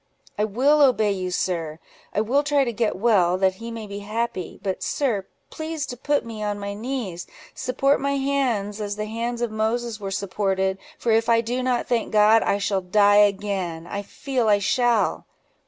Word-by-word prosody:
"I 210 - +1
will 270 +8 +3
obey 225 -7 +4
you, 185 -2 -2
sir; 165 -4 -2 0.3
I 210 - 0
will 255 +6 +2
try 290 -1 +2
to 240 -3 -2
get 225 0 0
well, 185 -4 +3
that 190 0 +2
he 230 - -5
may 230 -1 -6
be 200 0 -7
happy: 215 -2 -4
but, 190 -2 -2
sir, 225 -9 -1 0.2
please 315 -1 -4
to 245 - -6
put 285 +3 0
me 225 -2 -7
on 205 -1 -2
my 200 0 -5
knees: 215 -6 -4 0.3
support 270 +2 +1
my 280 0 0
hands, 245 -7 -1
as 205 -1 -3
the 210 0 -3
hands 235 +2 -3
of 235 - -1
Moses 220 +1 -1
were 200 -1 -4
supported, 190 -1 -1 0.2
for 235 - 0
if 225 +1 +2
I 230 0 +5
do 245 +2 -2
not 250 -1 0
thank 235 -2 0
God, 215 +1 +5
I 200 - +1
shall 200 -1 0
die 205 +2 +4
again—I 195 -2 -4
feel 250 +3 -2
I 205 -1 +5
shall." 235 +2 +1
215 Hz, 190 wpm, -23 LUFS, 200-245 Hz, 0.3 s, I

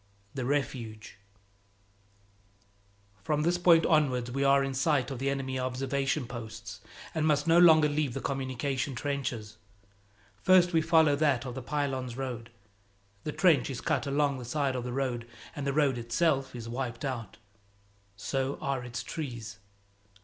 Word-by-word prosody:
XXI 100 0 -36
The 130 -3 -3
Refuge 120 -7 -3 2.0
FROM 150 -1 0
this 175 +2 +1
point 170 -2 +5
onwards 130 -7 +2
we 135 +2 -1
are 140 0 +5
in 135 0 -2
sight 140 -1 +1
of 130 - -5
the 135 +1 0
enemy 135 -1 -2
observation 135 +1 -1
posts, 115 -2 -8 0.3
and 155 0 +1
must 145 -1 +2
no 165 +1 +5
longer 160 -3 +7
leave 145 -4 -1
the - - -2
communication 135 +1 -2
trenches. 120 -6 -3 0.8
First 180 -1 +5
we 165 - +4
follow 160 -2 +4
that 140 -5 +2
of 125 - -5
the 130 - -5
Pylones 130 -3 -2
road. 125 -3 -5 0.8
The 150 - -1
trench 155 -7 +3
is 130 -3 -4
cut 145 -3 -1
along 140 -1 +1
the - - -7
side 135 +1 -1
of 125 - -3
the 125 - -4
road, 120 -3 -2 0.3
and 140 -1 -4
the - - +2
road 140 -3 +2
itself 130 +2 0
is 115 -1 -7
wiped 120 +1 -4
out; 115 -6 -5 0.8
so 135 +6 -2
are 135 -2 -2
its 125 0 -5
trees. 120 -10 -6
135 Hz, 155 wpm, -29 LUFS, 125-145 Hz, 2.0 s, longer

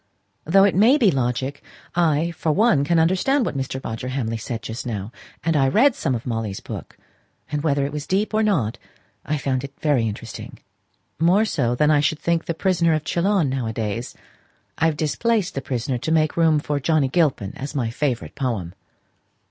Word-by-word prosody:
"Though 195 +5 +5
it 200 - +4
may 225 +9 +5
be 220 -9 +4
logic, 130 +1 -2 0.3
I, 165 -1 +2
for 165 -1 -1
one, 165 -5 +3
can 170 +4 +2
understand 190 - +2
what - - -3
Mr. 130 -1 -3
Roger 115 +3 -4
Hamley 125 -4 -2
said 115 0 -5
just 115 +2 -5
now; 105 -3 -4 0.3
and 165 -1 +1
I 135 -2 +4
read 235 - +4
some 130 - -1
of 115 - -5
Molly's 115 -5 -3
books; - - -8 0.5
and 150 -1 -1
whether 140 -3 +1
it 140 - -3
was 150 -1 -5
deep 205 +4 0
or 215 - +2
not 130 - 0 0.4
I 150 - -1
found 135 -2 -1
it 140 0 -9
very 140 -7 +2
interesting 105 - -7 0.6
more 180 +7 +4
so 125 - 0
than 150 +4 +3
I 150 - +4
should 150 +2 +1
think 170 +1 0
the 170 - -2
'Prisoner 170 -3 +2
of 155 - -2
Chillon' 175 +1 +1
now 130 -3 -2
a 110 - -3
days. 110 +2 -4 0.6
I've 160 -2 +1
displaced 205 +6 0
the 135 - -3
Prisoner 125 -2 -2
to 160 - -3
make 155 -1 +2
room 165 -2 +4
for 145 -1 -1
Johnnie 150 -1 +2
Gilpin 135 - +1
as 140 +2 -6
my 120 -5 -1
favourite 125 -1 -2
poem." 115 - -3
145 Hz, 195 wpm, -22 LUFS, 125-170 Hz, 0.6 s, Though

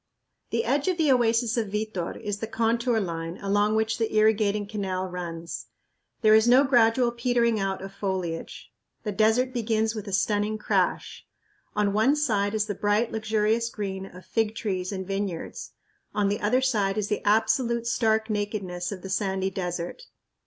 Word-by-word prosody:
The 230 0 0
edge 275 +6 +1
of 365 -2 +1
the 310 -4 +3
oasis 235 -1 +2
of 225 -2 0
Vitor 210 -5 -3
is 205 -1 -4
the 225 - -4
contour 235 +1 +1
line 165 -3 -4
along 205 +2 +1
which 220 +1 0
the 225 - 0
irrigating 215 -1 +3
canal 195 -3 -3
runs. 170 -2 -6 0.5
There 215 -2 +6
is 220 +1 +5
no 255 +3 +7
gradual 240 -2 +4
petering 235 -2 +1
out 195 -1 -2
of 195 0 -8
foliage. 185 -4 -4 0.3
The 210 - -2
desert 225 +5 +2
begins 220 -2 0
with 215 -2 -6
a - - -5
stunning 205 +2 +1
crash. 215 - -1 0.5
On 205 -1 +1
one 220 +8 +3
side 215 -8 +1
is 215 -1 +1
the 205 - -3
bright, 205 +4 +1
luxurious 220 +1 0
green 195 -3 -5
of 180 0 -13
fig 225 -1 0
trees 185 -4 -2
and 190 -1 -4
vineyards; 195 -3 -4 0.4
on 205 -1 +2
the 205 - -2
other 245 +5 +2
side 210 -6 +1
is 210 -1 0
the 210 - -1
absolute 235 +3 +2
stark 220 -2 +1
nakedness 205 -4 -3
of 185 -3 -7
the 195 - -6
sandy 190 -1 0
desert. 180 - -4
215 Hz, 170 wpm, -26 LUFS, 195-230 Hz, 0.5 s, no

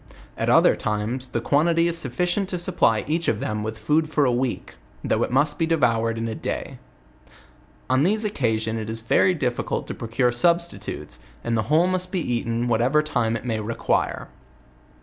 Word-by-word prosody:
At - - -1
other - - +5
times 110 +5 -2
the 125 - -2
quantity 165 +7 +2
is 170 - -1
sufficient 175 - -1
to 180 - -2
supply 170 - +1
each 165 +3 -1
of 105 - +1
them 105 -5 -2
with 110 +1 -4
food 150 +8 +1
for 150 -2 +2
a 125 - +3
week, 125 0 -2 0.3
though - - 0
it - - 0
must 145 +4 +1
be 165 - +1
devoured 115 -8 +1
in 115 0 -2
a 115 - -3
day. - - -5 1.1
On 130 +1 +2
these 210 +7 +2
occasion 115 - -1
it 110 0 -5
is 115 0 -4
very 180 +10 +3
difficult 125 -6 -2
to - - -5
procure 120 +2 0
sub 170 +8 +3
stitutes, 170 - -8 0.2
and 115 - -1
the 110 - +2
whole 160 +3 +4
must 185 0 -1
be 185 - 0
eaten 115 0 -1
whatever 125 +6 +2
time 115 -6 0
it 115 - -11
may 115 -3 -1
require. 115 +2 -1
125 Hz, 190 wpm, -23 LUFS, 115-165 Hz, 1.1 s, other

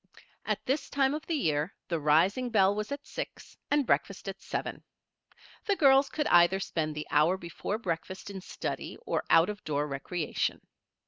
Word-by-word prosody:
At - - -1
this 275 +4 -1
time 275 -1 +2
of 305 +1 -5
the 330 - 0
year 155 - 0
the 170 -3 -1
rising 175 - +3
bell 200 -3 +4
was 210 +4 -4
at 285 0 -5
six - - -7
and 290 -1 +2
breakfast 195 -4 0
at 195 0 -6
seven. - - -4 0.9
The 405 - +3
girls 275 -4 +5
could 300 - -2
either 175 -1 +5
spend 155 -5 -2
the 150 - -4
hour 160 +5 +4
before 180 +4 -4
breakfast 190 -1 -4
in 190 -1 -7
study - - -5
or - - -1
out 165 +2 +6
of 205 - -11
door 145 -1 -1
recreation. 150 +4 -2
190 Hz, 175 wpm, -29 LUFS, 165-265 Hz, 0.9 s, out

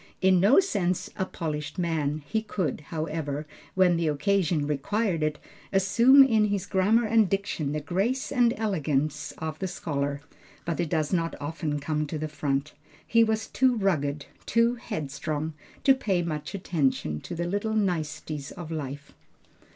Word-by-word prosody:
In 190 -1 +4
no 205 - +6
sense 200 - 0
a 190 - -1
polished 150 -1 -4
man, 155 -4 -1
he 220 +6 -1
could, 190 -8 -2
however, 155 -2 -3 0.3
when 180 -2 +4
the 165 -1 0
occasion 165 0 +1
required 165 +5 0
it, 155 -1 0 0.3
assume 235 +8 +6
in 220 -5 +3
his 200 -3 -1
grammar 205 +5 +3
and 220 -2 +3
diction 195 -7 -1
the 150 0 -2
grace 200 - -1
and 245 -4 +4
elegance 155 -8 -1
of 160 -1 -5
the 190 - -2
scholar, 145 -5 -2 0.5
but 170 -3 -2
it 170 -3 0
does 155 -1 0
not 165 -2 0
often 150 0 -3
come 150 +1 -1
to 155 - -4
the 155 +1 -3
front. 145 -1 -2 0.3
He 230 0 +4
was 220 -1 0
too 255 +2 +2
rugged, 150 -9 0 0.2
too 230 +1 +3
headstrong, 155 - -4 0.3
to 270 - +7
pay 195 -9 0
much 155 0 -4
attention 135 - -1
to 175 - -6
the 170 +1 -2
little 205 +4 -1
niceties 155 -7 -2
of 170 -3 -8
life. 145 -2 -5
170 Hz, 160 wpm, -27 LUFS, 150-205 Hz, 0.5 s, to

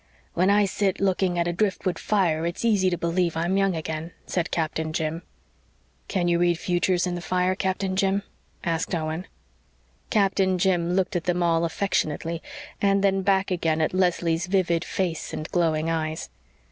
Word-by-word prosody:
"When 185 +3 +2
I 205 0 +5
sit 195 0 0
looking 190 -2 +1
at 170 0 +1
a 175 - 0
driftwood 185 -2 -1
fire 175 -7 +1
it's 170 +6 -3
easy 200 -5 +3
to 175 - -1
believe 170 0 0
I'm 170 +3 0
young 195 -2 +2
again," 160 +1 -4
said 175 -1 -1
Captain 160 -1 -2
Jim. 160 +1 -2 0.9
"Can 180 -3 0
you 170 0 +2
read 175 -1 +3
futures 180 +1 +1
in 180 - -2
the 175 - -4
fire, 180 +2 +1
Captain 190 0 -1
Jim?" 195 +1 +1 0.4
asked 165 0 -1
Owen. 160 +2 -3 0.8
Captain 195 -2 +2
Jim 175 -1 +1
looked 190 +1 0
at 175 - -1
them 180 -1 +1
all 165 0 +2
affectionately 165 -2 -1 0.4
and 200 0 +3
then 195 -1 +3
back 195 0 +2
again 165 -3 +1
at 155 - +1
Leslie's 175 -2 +1
vivid 180 -3 +1
face 175 -4 -3
and 155 - -4
glowing 160 -2 +1
eyes. 160 -1 -2
175 Hz, 170 wpm, -25 LUFS, 165-190 Hz, 0.9 s, I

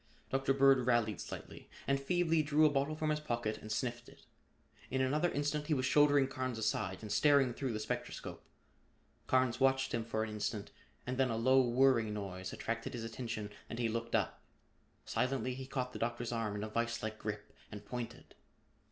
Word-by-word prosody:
Dr. 135 0 +2
Bird 135 -2 +5
rallied 115 -5 +2
slightly - - -8 0.2
and 140 0 +2
feebly 165 +1 +2
drew 150 +1 +4
a 150 - +5
bottle 140 +2 0
from 155 0 0
his 150 - 0
pocket 120 -6 -2
and 110 - -8
sniffed 120 +1 -2
it. - - -18 0.7
In 130 - -1
another 150 +6 +2
instant 145 0 -1
he 155 - +2
was 130 -1 0
shouldering 145 0 +5
Carnes 130 -2 -3
aside 95 -3 -1
and 105 - -6
staring 140 +2 +4
through 130 0 -2
the 110 - -2
spectroscope. 110 - -5 0.8
Carnes 130 -2 +2
watched 135 0 +3
him 115 - 0
for 110 -1 -1
an 110 - -4
instant 105 0 -3 0.3
and 130 +1 -3
then 130 -1 +3
a 115 - -1
low 130 +3 +5
whirring 120 -3 +3
noise 95 -2 -5
attracted 115 0 -3
his 115 - -4
attention 115 -2 -4 0.2
and 115 - -5
he 120 -1 +1
looked 115 +1 -2
up. - - 0 0.6
Silently 130 +1 0
he 130 +1 -7
caught 130 -2 -3
the - - -6
Doctor's 120 0 -2
arm 115 -3 -1
in 105 - -3
a 110 - -4
viselike 115 -1 -2
grip 105 0 -5 0.2
and 105 -1 -8
pointed. 120 +1 -6
125 Hz, 185 wpm, -34 LUFS, 110-135 Hz, 0.8 s, Bird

